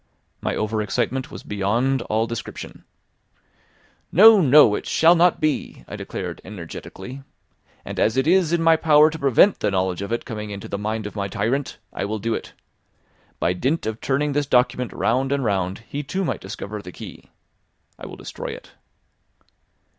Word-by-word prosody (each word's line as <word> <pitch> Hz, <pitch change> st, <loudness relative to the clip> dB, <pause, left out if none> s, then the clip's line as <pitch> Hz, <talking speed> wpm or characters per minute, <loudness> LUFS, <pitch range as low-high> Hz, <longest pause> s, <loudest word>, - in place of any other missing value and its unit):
My -, -, -1 dB
over 110 Hz, 0 st, -1 dB
excitement 120 Hz, +5 st, -2 dB
was -, -, -9 dB
beyond 115 Hz, +7 st, 0 dB
all 110 Hz, 0 st, 0 dB
description. 115 Hz, -1 st, -7 dB, 1.3 s
"No! 215 Hz, +2 st, +8 dB
no! 145 Hz, -6 st, +7 dB
it -, -, -3 dB
shall 165 Hz, +2 st, +5 dB
not 175 Hz, 0 st, +3 dB
be," 150 Hz, -, -2 dB
I -, -, -7 dB
declared -, -, -6 dB
energetically; 105 Hz, +7 st, -9 dB, 0.6 s
"and -, -, -5 dB
as 110 Hz, +3 st, +2 dB
it 130 Hz, -, +2 dB
is 175 Hz, 0 st, +3 dB
in 170 Hz, -1 st, +1 dB
my 165 Hz, 0 st, +5 dB
power 155 Hz, -1 st, +5 dB
to 160 Hz, -, -7 dB
prevent 140 Hz, -, +4 dB
the 105 Hz, -, +1 dB
knowledge 95 Hz, -1 st, -1 dB
of 100 Hz, -, -5 dB
it 115 Hz, -, -2 dB
coming 105 Hz, -3 st, -6 dB
into 100 Hz, -1 st, -7 dB
the 100 Hz, -, -4 dB
mind 110 Hz, +1 st, -3 dB
of 105 Hz, -, -7 dB
my 100 Hz, -1 st, -2 dB
tyrant, 130 Hz, +8 st, -2 dB, 0.2 s
I -, -, -3 dB
will 110 Hz, +2 st, -3 dB
do 115 Hz, +2 st, -2 dB
it. -, -, -6 dB, 0.9 s
By 90 Hz, -, +1 dB
dint 135 Hz, -, -1 dB
of 110 Hz, 0 st, -4 dB
turning 145 Hz, +2 st, 0 dB
this 145 Hz, 0 st, 0 dB
document 125 Hz, -1 st, +2 dB
round 130 Hz, +4 st, 0 dB
and 140 Hz, -1 st, 0 dB
round, 95 Hz, 0 st, -1 dB
he 145 Hz, -, -4 dB
too 185 Hz, +7 st, -3 dB
might -, -, -3 dB
discover 100 Hz, +2 st, -6 dB
the 90 Hz, -, -10 dB
key. -, -, -11 dB, 0.7 s
I -, -, -8 dB
will -, -, -9 dB
destroy -, -, -7 dB
it." -, -, -12 dB
120 Hz, 175 wpm, -22 LUFS, 105-150 Hz, 1.3 s, No